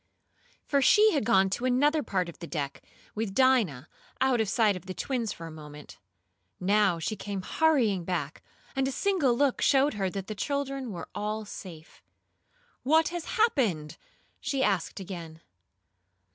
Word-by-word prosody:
For 280 -2 +2
she 430 +9 +6
had 285 - 0
gone 195 -4 +4
to 240 - -2
another 290 +5 +3
part 185 -9 -1
of 170 - -10
the 170 - -7
deck, 140 -4 -4 0.3
with 210 -2 -3
Dinah, 225 - +3 0.3
out 260 -3 +3
of 215 - -1
sight 210 0 +3
of 185 +1 -9
the 185 - -5
twins 240 -6 -2
for 165 - -8
a 165 - -8
moment. 150 -1 -11 0.6
Now 195 -1 +3
she 165 +6 -3
came 200 -2 -5
hurrying 240 - +2
back, 165 -4 -3 0.3
and 265 0 +1
a - - -1
single 300 -8 +1
look 280 -2 +1
showed 280 +1 +4
her 195 -3 -1
that 195 0 -5
the 215 - -5
children 275 +1 -3
were 175 - -7
all 215 +1 -3
safe. 170 -5 -11 0.8
"What 315 +4 +3
has 345 -2 -5
happened?" 220 - +1 0.4
she 270 -2 -1
asked 195 -5 0
again. 170 -4 -8
210 Hz, 160 wpm, -28 LUFS, 180-270 Hz, 0.8 s, she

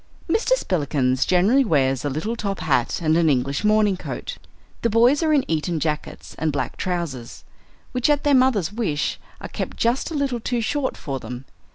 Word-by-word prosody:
Mr. 450 +8 +2
Spillikins 140 - 0
generally 200 +10 +4
wears 135 - +1
a 145 - -1
little 160 - -3
top 200 -4 -3
hat 130 -5 +1
and 155 0 +3
an 165 -1 +3
English 135 +4 0
morning 210 -2 +3
coat. - - -6 0.4
The 230 - +1
boys 240 +7 +4
are 320 -1 +2
in 290 -3 +3
Eton 160 +1 -1
jackets 150 0 -4
and 160 0 0
black 140 -2 -3
trousers, 170 -10 -4 0.5
which, 250 +2 0
at 295 -1 +2
their 290 -1 +3
mother's 245 -9 +3
wish, 195 -10 -1 0.2
are - - -5
kept - - -5
just 235 +3 0
a 330 - -5
little 275 -4 -1
too 240 +2 -2
short 260 +4 -1
for 135 -2 -4
them. 125 +2 -8
185 Hz, 185 wpm, -22 LUFS, 145-245 Hz, 0.5 s, generally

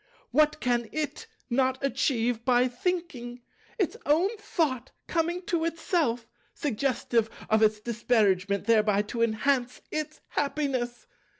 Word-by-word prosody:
What 300 +3 +3
can 240 -4 0
It 305 +7 -3 0.2
not 260 +1 +2
achieve 245 -4 +1
by 250 0 +4
thinking! 250 -4 -3 0.3
Its 385 -8 0
own 350 +9 +3
Thought 285 - -1 0.2
coming 345 +2 -1
to 340 -2 0
Itself, 325 -8 0 0.3
suggestive 240 -4 0 0.2
of 220 0 +4
its 215 -1 +4
disparagement, 210 -4 +1
thereby 215 -3 +4
to 230 +3 -4
enhance 245 +3 +1
Its 310 0 -3
happiness! 270 -4 -1
250 Hz, 115 wpm, -28 LUFS, 230-305 Hz, 0.3 s, by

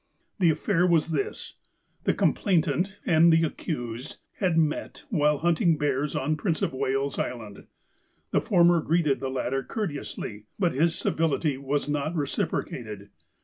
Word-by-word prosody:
"The 175 -3 +5
aff'air 180 +3 +2
was 165 -1 +3
this: 145 -4 -3 0.2
— - - -42
The - - +2
complainant, 190 +1 +1
and 170 0 +5
the 165 0 +4
accused, 125 -7 -4 0.2
had 180 -5 +1
met 155 -2 -1
while 150 -5 +3
hunting 165 0 +2
bears 145 0 -1
on 155 +3 0
Prince 165 0 -1
of - - 0
Wales 135 +1 -1
Island. 110 -5 -5 0.6
The - - +2
former 175 -3 +4
greeted 155 -3 +1
the 135 - -3
latter 130 0 -1
courteously, 140 - -5
but 180 -4 +1
his 165 +5 +2
civility 155 -2 0
was 140 +1 -1
not 150 +3 -1
reciprocated. 110 -7 -3
155 Hz, 145 wpm, -26 LUFS, 135-170 Hz, 0.6 s, The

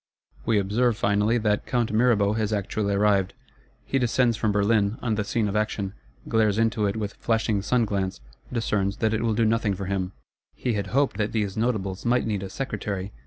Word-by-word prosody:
We 115 - +3
observe 110 +4 +1
finally, 105 +1 +2
that 105 -2 0
Count 120 -3 0
Mirabeau 110 -3 +3
has 110 -1 -1
actually 100 0 -1
arrived. 100 -2 +2 0.5
He 135 - 0
descends 120 -1 +2
from 110 -1 0
Berlin, 105 +1 +2
on 115 -3 -1
the 105 -1 0
scene 110 +1 0
of 100 - -3
action; 105 -2 -1 0.3
glares 110 -2 +2
into 110 -2 +2
it 100 - -2
with 105 -2 -3
flashing 110 -3 0
sun 120 +4 +2
glance; 95 - -2 0.3
discerns 105 -4 0
that 110 -1 +1
it 110 - 0
will 115 -2 +1
do 115 +1 +2
nothing 110 -2 +1
for 95 +1 -5
him. 95 0 -2 0.4
He 125 - -1
had 100 -2 -2
hoped 135 -5 +1
these 105 -4 -1
Notables 105 -5 -1
might 125 +1 +2
need 105 -3 -1
a 95 - -5
Secretary. 100 -5 -4
105 Hz, 190 wpm, -25 LUFS, 100-115 Hz, 0.5 s, We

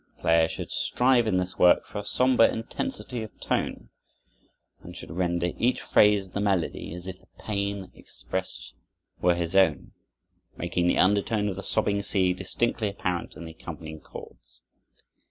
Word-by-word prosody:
The - - -27
player 80 0 +4
should - - -6
strive 125 -2 +2
in 95 - +2
this 90 0 -2
work 90 - +6
for 105 - -6
a - - -5
somber 125 +2 +4
intensity 125 - -3
of 110 - -9
tone, - - -2 0.9
and - - -11
should - - -9
render 85 0 0
each 125 +2 +2
phrase 105 -2 +4
of 95 - -19
the - - -2
melody 95 -7 -1
as 90 0 -9
if 95 -1 -7
the 95 - -25
pain 100 -2 -3
expressed - - -6 0.5
were 90 0 +4
his 85 +1 -3
own, 95 -1 +3 0.7
making 85 0 0
the - - +2
undertone 105 +2 +2
of 95 - -4
the 100 - -5
sobbing 100 0 +1
sea 95 -3 +2
distinctly 105 +4 -1
apparent 90 -3 -3
in 85 - -8
the 80 - -8
accompanying 80 -1 -8
chords. - - -13
95 Hz, 165 wpm, -27 LUFS, 85-105 Hz, 0.9 s, work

